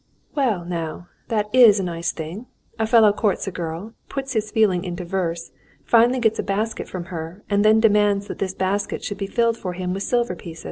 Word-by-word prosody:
"Well, 230 - 0
now, 170 0 -5 0.2
that 215 -2 0
is 230 -5 +7
a - - -1
nice 170 -1 -2
thing. 170 +10 -7 0.3
A 220 - +1
fellow 220 -2 +6
courts 210 -2 0
a 195 - -3
girl, 175 +5 -5 0.2
puts 270 -1 -4
his 215 -2 -1
feelings 200 -6 +2
into 180 -1 -5
verse, 170 -2 -3 0.3
finally 235 +2 +4
gets 225 -2 +1
a - - +3
basket 215 +3 -2
from 180 -2 -5
her, 165 +4 -6
and 200 0 +3
then 215 +1 +5
demands 205 -2 +3
that - - -7
this 190 -1 -2
basket 195 +2 -1
should 205 -1 -4
be 195 - -2
filled 230 +2 +1
for 180 -4 -5
him 180 0 -3
with 195 - -4
silver 240 -4 0
pieces." 165 -2 -10
200 Hz, 205 wpm, -22 LUFS, 180-220 Hz, 0.3 s, is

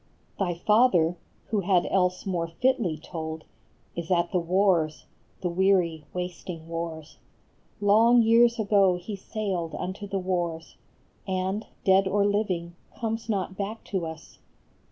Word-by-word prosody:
Thy 180 -3 0
father, 180 -4 +3 0.3
who 215 - +1
had 185 -2 +2
else 180 -1 +1
more 175 -4 -1
fitly 210 - 0
told, 160 0 -6 0.5
Is 170 -1 -5
at 175 -2 +2
the 180 - +2
wars, 175 -3 +1 0.4
the 180 - -1
weary, 175 -4 +2
wasting 180 -2 -6
wars; 165 -2 -6 0.6
Long 225 +4 +5
years 235 +1 +5
ago 200 -4 +3
he 180 +4 -6
sailed 190 -5 -3
unto 190 +3 -5
the 195 - -2
wars, 175 -3 -3 0.5
And, 190 +2 -2 0.2
dead 190 0 +5
or 200 +1 +2
living, 185 -5 -1 0.2
comes 225 0 -3
not 190 -3 -1
back 205 +3 -5
to 180 -4 0
us. 160 0 -10
185 Hz, 135 wpm, -26 LUFS, 170-205 Hz, 0.6 s, Long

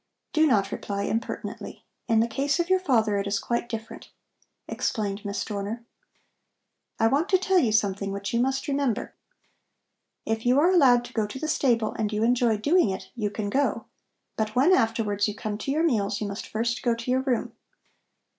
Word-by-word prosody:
"Do 315 0 +4
not 200 -7 +2
reply 200 0 -3
impertinently. 225 +2 -4 0.2
In 225 -2 +3
the 230 - +1
case 275 +6 -1
of 345 +2 0
your 375 - +5
father 225 - +2
it 200 - -2
is 200 0 0
quite 235 +3 -2
different," 225 -1 -7 0.6
explained 205 -3 -2
Miss 200 0 -3
Dorner. 210 +3 -5 1.1
"I 225 - +3
want 285 - +2
to 375 - +5
tell 380 0 +2
you 240 -9 +2
something 200 -2 0
which 200 +2 -4
you 235 - +2
must 265 +2 0
remember. 275 -5 -1 1.1
If 225 0 -2
you 250 +3 +4
are 340 +5 +4
allowed 255 -9 +5
to - - -12
go 220 -2 0
to 210 - -7
the 315 - -3
stable 235 -7 +1
and 215 -1 0
you 210 +1 0
enjoy 235 -2 +3
doing 290 - +3
it, 190 - -6
you 215 -4 -1
can 205 0 -4
go. 280 +4 0 0.5
But 215 0 -2
when 280 +9 +5
afterwards 225 - +1
you 210 - -4
come 215 -1 -4
to 270 - -3
your 310 +3 +1
meals, 215 -9 +1
you 210 - -3
must 200 +1 -6
first 235 +2 -2
go 240 -3 +1
to 230 +2 -4
your 260 +1 +2
room. 260 -3 -1
230 Hz, 195 wpm, -26 LUFS, 210-270 Hz, 1.1 s, your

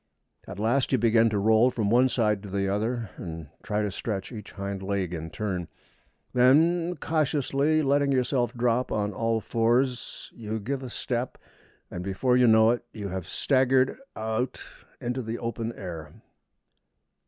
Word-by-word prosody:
At - - -7
last 120 +6 +1
you 130 - +4
begin 115 0 +4
to 105 - -1
roll 110 +4 +4
from 110 -5 -1
one 125 +2 +5
side 105 -4 +1
to 100 - -9
the 100 0 -1
other, 110 +2 -1
and 80 -3 -7
try 105 0 -1
to 105 - -1
stretch 100 +1 -4
each 110 -4 -9
hind 100 -1 -4
leg 95 -2 -2
in 80 -1 -5
turn; 90 -1 -3 0.7
then, 165 +8 +4
cautiously 155 -1 +1
letting 140 0 +2
yourself 125 -1 +1
drop 120 +1 +1
on 105 -1 -1
all 115 +2 0
fours, 120 +3 0
you 110 -1 -4
give 130 +6 -3
a 130 - -6
step, 120 +1 -3 0.5
and 90 - -5
before 100 +7 +1
you 125 -1 +5
know 110 0 +6
it 120 0 -2
you 105 -3 -6
have 95 -2 -5
staggered 130 -1 +2 0.2
out 110 +4 -2 0.4
into 125 +2 -2
the 115 0 -4
open 115 -1 -3
air. 85 -7 -7
115 Hz, 160 wpm, -27 LUFS, 100-130 Hz, 0.7 s, know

